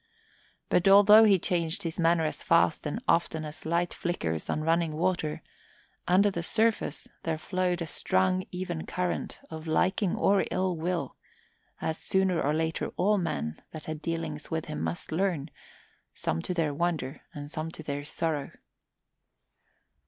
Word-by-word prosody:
But 180 +2 +2
although 205 +3 +8
he 200 -3 +6
changed 170 -2 -1
his 165 0 -4
manner 165 -1 +3
as 155 - -3
fast 165 -2 +3
and 145 - -4
often 160 -2 +1
as 150 +1 -8
light 170 +1 +1
flickers 80 - -2
on 155 - -1
running 165 0 +2
water, 160 -1 -1 0.6
under 200 +3 +4
the 170 - -3
surface 220 -4 0
there 160 -1 -1
flowed 180 +1 -1
a - - -3
strong, 185 +3 +1
even 180 -3 -4
current 180 -1 -2
of 160 0 -7
liking 185 +4 +1
or 200 0 +3
ill 185 -1 0
will, 165 -3 -2 0.6
as 160 0 -2
sooner 190 -3 +1
or 145 - +1
later 160 +1 -1
all 205 +3 +3
men 115 - -3
that 155 -1 -8
had 155 -1 -5
dealings 160 -2 -4
with 160 -1 -2
him 155 - -5
must 80 - -3
learn, 165 -4 0 0.6
some 80 - -2
to 180 - -3
their 160 -4 +1
wonder 155 -3 -2
and 145 0 -7
some 155 0 -3
to 160 - -9
their 145 -1 -3
sorrow. 155 -1 -2
165 Hz, 155 wpm, -28 LUFS, 155-180 Hz, 0.6 s, although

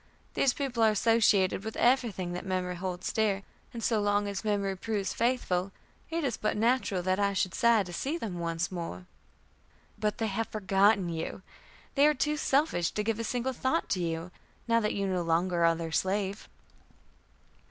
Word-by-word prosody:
These 265 - +2
people 265 -5 -2
are 220 - +6
associated 210 -3 +3
with 220 0 -5
everything 225 -8 +1
that 180 - -4
memory 185 -1 -2
holds 180 0 -4
dear, 205 -3 +1 0.3
and 235 -2 -7
so 220 -3 +2
long 205 0 +1
as 200 +1 -4
memory 200 -2 0
proves 205 0 -2
faithful, 200 -6 0 0.4
it 330 0 -2
is 255 -5 -1
but 215 - -1
natural 225 -5 +1
that 185 +1 +1
I 200 0 +2
should 185 -1 0
sigh 235 -4 +4
to 175 -1 -9
see 280 - -2
them 195 - -5
once 170 +1 -2
more." 165 - -5 0.9
"But 210 -1 0
they 225 - -1
have 220 +2 -2
forgotten 195 -2 +2
you. 165 +3 -5 0.5
They 285 +1 +5
are 300 - +3
too 300 +3 0
selfish 275 - +1
to 210 - -2
give 225 +1 -1
a - - -1
single 245 +3 -2
thought 260 +7 -1
to 185 - 0
you, 165 +1 -3 0.4
now 230 0 +4
that 210 -2 -1
you 200 - -1
no 185 -2 0
longer 170 +1 +1
are 165 0 +4
their 165 -1 -5
slave." 195 +3 -1
200 Hz, 185 wpm, -29 LUFS, 185-230 Hz, 0.9 s, are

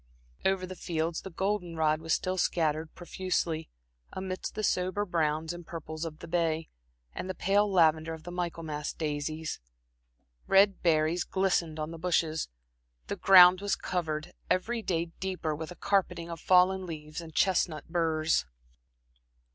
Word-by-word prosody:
Over 190 -1 +1
the 185 0 -8
fields 165 -1 -2
the 190 - -7
golden 190 -1 -2
rod 155 -1 +1
was 160 0 -4
still 185 0 -2
scattered 155 -2 0
profusely, 175 -3 -2 0.4
amidst 190 0 -5
the 215 - -3
sober 185 +2 0
browns 160 -2 0
and 175 0 -8
purples 160 -1 -6
of 155 -2 -6
the - - -10
bay, 165 -1 0 0.4
and 185 - -5
the 185 - -3
pale 200 +3 +2
lavender 160 -3 +3
of 160 - -14
the 175 - -7
Michaelmas 165 -4 -3
daisies. 155 0 -3 0.9
Red 195 0 +5
berries 160 +1 +2
glistened 180 -4 0
on 155 +1 -3
the 165 - -8
bushes, 160 -2 0 0.6
the - - -1
ground 185 -1 +8
was 205 0 +1
covered, 160 -3 -3 0.2
every 230 +5 0
day 170 -4 -1
deeper, 185 -4 -2
with 155 +1 -6
a 180 - -9
carpeting 175 -3 0
of 165 - -7
fallen 185 0 +4
leaves 155 0 -6
and 160 -2 -11
chestnut 160 -4 +1
burrs. 160 - +1
170 Hz, 150 wpm, -29 LUFS, 160-185 Hz, 0.9 s, ground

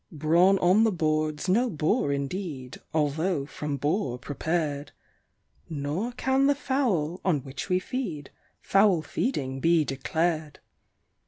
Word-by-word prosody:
Brawn 170 +5 +4
on 185 +4 +4
the 225 - +3
board's 155 -2 -1
no 235 +7 +3
bore 155 - 0
indeed 140 -2 -4
although 155 +1 0
from 145 0 -4
boar 145 - -1
prepared; 145 +1 -3 0.8
Nor 155 +9 -2
can 265 +2 +2
the 285 - +3
fowl, 210 - -1
on 160 -7 +1
which 135 +7 -7
we 180 - +3
feed, 185 - -4 0.3
foul 195 -5 +4
feeding 135 - -2
he 165 -2 +3
declared. 155 +3 -2
160 Hz, 120 wpm, -27 LUFS, 145-195 Hz, 0.8 s, Brawn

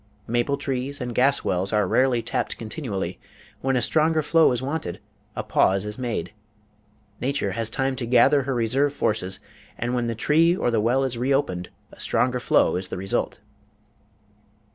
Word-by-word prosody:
Maple 120 +4 0
trees 140 0 -3
and 125 -2 -4
gas 135 +4 +3
wells 95 +2 0
are 105 -3 +2
rarely 125 +1 +2
tapped - - -2
continually; 110 - -4 0.4
when 135 0 +1
a 125 - +1
stronger 155 0 +2
flow 160 0 +4
is 125 - 0
wanted, 135 - -4 0.4
a - - -3
pause 95 +1 +2
is 105 +3 -6
made, 115 -8 -3 0.9
nature 130 -6 -1
has 115 +2 -2
time 135 +3 -1
to 120 - -3
gather 125 +4 +5
her 135 0 -2
reserve 130 +5 +1
forces, 95 -7 -1 0.4
and 120 +1 -2
when 120 -1 0
the 115 - -2
tree 165 +9 +3
or 120 - 0
the 115 -2 +2
well 125 +5 +2
is 125 -3 -2
reopened, 125 -9 0 0.2
a - - -16
stronger 125 0 +1
flow - - +3
is 90 0 -4
the - - -5
result. 100 +3 -2
125 Hz, 170 wpm, -24 LUFS, 110-135 Hz, 0.9 s, gather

